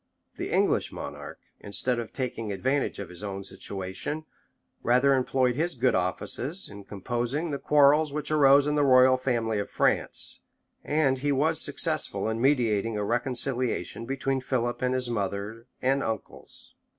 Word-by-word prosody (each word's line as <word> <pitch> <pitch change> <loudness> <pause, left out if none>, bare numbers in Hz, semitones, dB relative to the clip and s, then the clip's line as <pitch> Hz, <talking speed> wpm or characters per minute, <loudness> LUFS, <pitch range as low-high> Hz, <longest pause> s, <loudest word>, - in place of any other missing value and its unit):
The - - -4
English - - +2
monarch, - - -7 0.2
instead 120 +4 -1
of 115 - -5
taking 120 -5 -3
advantage 130 +9 0
of 100 -3 -6
his 90 +3 -6
own 100 -1 -4
situation, 100 +12 -5 0.6
rather 125 +4 +4
employed 130 -1 +1
his 165 +3 -1
good 125 +1 +2
offices 125 - -2
in 100 -1 -11
composing 120 - -2
the 140 - -3
quarrels 150 +1 +4
which 150 +1 -4
arose 140 -2 +6
in 150 - 0
the 150 -1 +2
royal 130 -1 +6
family 120 -4 -1
of 100 - -4
France; - - -1 0.4
and 145 -3 +1
he 145 +2 0
was 155 +4 +1
successful - - 0
in 110 +1 -2
mediating 115 -5 +2
a 105 - -1
reconciliation 120 -1 -1
between 135 0 -1
Philip 120 -1 -1
and 125 0 +1
his 130 -1 -1
mother 105 +1 -3 0.2
and 135 +2 +2
uncles. 110 -2 -6
125 Hz, 150 wpm, -27 LUFS, 110-140 Hz, 0.6 s, arose